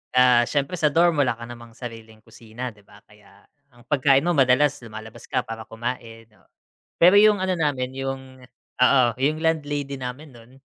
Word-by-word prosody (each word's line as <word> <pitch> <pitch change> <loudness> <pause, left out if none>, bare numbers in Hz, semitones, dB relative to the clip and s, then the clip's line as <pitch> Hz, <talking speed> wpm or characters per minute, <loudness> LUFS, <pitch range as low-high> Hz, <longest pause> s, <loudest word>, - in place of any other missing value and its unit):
Ah, 125 -1 +6
siyempre 140 +3 -2
sa 155 - +3
dorm 165 +1 +2
wala 130 -4 +1
ka 115 - -8
namang 120 -1 -12
sariling 115 -3 -10
kusina, 115 +2 -8
'di 105 - -22
ba, 100 0 -19
kaya 105 0 -22 0.3
ang 120 -2 -21
pagkain 135 +1 +3
mo 175 - +2
madalas 140 +1 +3
lumalabas 110 -1 -11
ka - - 0
para 110 -1 -8
kumain, 115 -1 -6
oo. 100 - -28 0.5
Pero 180 +4 +7
yung 210 -2 +5
ano 185 -1 -1
namin 140 -5 -1
yung 135 0 -4 0.6
oo, 125 +1 +5
yung 150 +4 0
landlady 145 -4 -2
namin 130 +4 -7
nun, 115 +1 -17
125 Hz, 175 wpm, -23 LUFS, 115-145 Hz, 0.6 s, Pero